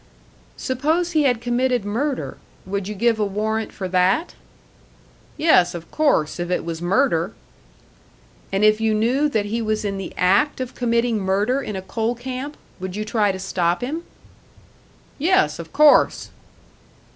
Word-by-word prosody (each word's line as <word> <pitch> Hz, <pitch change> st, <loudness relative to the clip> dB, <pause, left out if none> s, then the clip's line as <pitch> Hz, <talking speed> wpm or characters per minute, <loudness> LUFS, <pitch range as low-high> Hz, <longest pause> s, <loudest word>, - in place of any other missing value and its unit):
"Suppose 310 Hz, +7 st, 0 dB
he 310 Hz, -3 st, +2 dB
had 245 Hz, -4 st, +2 dB
committed 245 Hz, -1 st, 0 dB
murder 255 Hz, +7 st, -2 dB, 0.3 s
would 195 Hz, 0 st, -3 dB
you 210 Hz, -, -5 dB
give 225 Hz, +2 st, +1 dB
a -, -, +2 dB
warrant 215 Hz, +2 st, -2 dB
for 190 Hz, -, -5 dB
that?" 185 Hz, -, +2 dB, 1.0 s
"Yes, 185 Hz, -, +4 dB
of 170 Hz, -1 st, -9 dB
course, 280 Hz, -, +1 dB
if 175 Hz, 0 st, -3 dB
it 180 Hz, -, -1 dB
was 165 Hz, -1 st, -5 dB
murder." 190 Hz, -1 st, +1 dB, 1.2 s
"And 195 Hz, +2 st, 0 dB
if 215 Hz, +1 st, +4 dB
you 220 Hz, -1 st, +2 dB
knew 255 Hz, +7 st, +2 dB
that 220 Hz, -6 st, 0 dB
he 225 Hz, +3 st, -2 dB
was 215 Hz, -1 st, -1 dB
in 195 Hz, -1 st, -2 dB
the 190 Hz, -, -6 dB
act 200 Hz, +12 st, +2 dB
of 255 Hz, -1 st, -4 dB
committing 235 Hz, -2 st, 0 dB
murder 205 Hz, +7 st, +1 dB
in 210 Hz, -, -5 dB
a 190 Hz, -, -5 dB
coal 225 Hz, +5 st, -2 dB
camp 260 Hz, +4 st, -6 dB, 0.2 s
would 185 Hz, 0 st, -5 dB
you 215 Hz, +1 st, -3 dB
try 215 Hz, -2 st, +1 dB
to 190 Hz, -, -5 dB
stop 180 Hz, -2 st, -1 dB
him?" 295 Hz, +7 st, -3 dB, 1.2 s
"Yes, 275 Hz, -, +2 dB
of 165 Hz, -1 st, -8 dB
course." 300 Hz, 0 st, +4 dB
220 Hz, 155 wpm, -22 LUFS, 190-255 Hz, 1.2 s, Yes